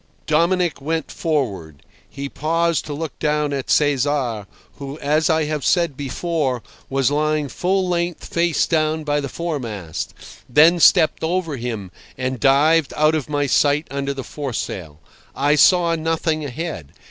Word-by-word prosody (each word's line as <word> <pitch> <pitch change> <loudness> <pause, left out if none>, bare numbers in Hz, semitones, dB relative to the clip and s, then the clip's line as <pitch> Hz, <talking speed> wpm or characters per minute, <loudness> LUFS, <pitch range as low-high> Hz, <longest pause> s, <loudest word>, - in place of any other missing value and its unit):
Dominic 170 +1 +1
went 160 +2 -2
forward. 100 - -3 0.3
He 140 0 -6
paused 165 +3 0
to 150 - -4
look 160 +1 -6
down 150 -1 0
at 135 -2 -4
Cesar, 135 -7 +1 0.3
who, 140 +1 -7
as 155 +2 +1
I 160 -1 +2
have 150 -2 -3
said 170 -6 +2
before, 140 -2 -2 0.3
was 135 0 +1
lying 150 0 0
full 185 +4 0
length 175 -1 -2
face 170 -1 +1
down 155 -1 0
by 145 -1 0
the 140 - -4
foremast, 115 - -5 0.3
then 160 +7 +5
stepped 160 -1 +5
over 165 -2 -1
him, 115 -7 -5 0.3
and 130 -1 -3
dived 145 +3 +3
out 155 +1 +4
of 155 -3 -2
my 145 -1 0
sight 145 +3 +2
under 140 0 -2
the 135 - -5
foresail. 100 - -5 0.4
I 145 +2 +2
saw 170 +3 +5
nothing 160 -1 -1
ahead. 140 - -6
150 Hz, 145 wpm, -21 LUFS, 135-160 Hz, 0.4 s, then